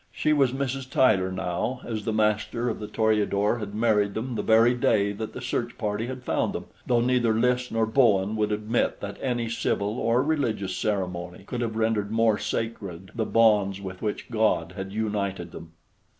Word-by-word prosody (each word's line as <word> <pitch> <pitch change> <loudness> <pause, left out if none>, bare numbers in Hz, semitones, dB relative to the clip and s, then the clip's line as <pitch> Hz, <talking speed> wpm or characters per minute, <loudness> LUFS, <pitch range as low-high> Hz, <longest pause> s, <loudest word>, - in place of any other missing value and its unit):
She 155 - +1
was 135 -4 +3
Mrs. 135 0 -3
Tyler 95 -9 +3
now, 95 +7 -2
as 110 -3 -4
the 110 - 0
master 110 +3 0
of 110 - -4
the 105 - -5
Toreador 105 0 +1
had 105 -1 -6
married 105 -3 +2
them 120 +3 -3
the 110 - -1
very 115 +3 +5
day 100 -4 +2
that 105 +2 -6
the 125 - -7
search 120 -1 -2
party 105 0 -2
had 130 0 -6
found - - 0
them, - - -5 0.2
though 120 -1 +3
neither 120 -2 +2
Lys 125 +2 +1
nor 115 0 +1
Bowen 110 -4 +3
would 105 -1 0
admit 105 +3 0
that 100 0 -6
any 120 -3 -1
civil 110 -1 -1
or 120 +2 +2
religious 115 -11 -1
ceremony 90 -3 -3
could 120 +3 -4
have 115 -2 -2
rendered 110 -2 0
more 110 -1 +2
sacred 100 -6 -4
the 115 -2 -1
bonds 105 -4 +3
with 95 -2 -8
which 105 +2 -4
God 110 -7 +1
had 95 -1 -5
united 100 -5 -2
them. 80 0 -11
110 Hz, 185 wpm, -26 LUFS, 100-120 Hz, 0.2 s, very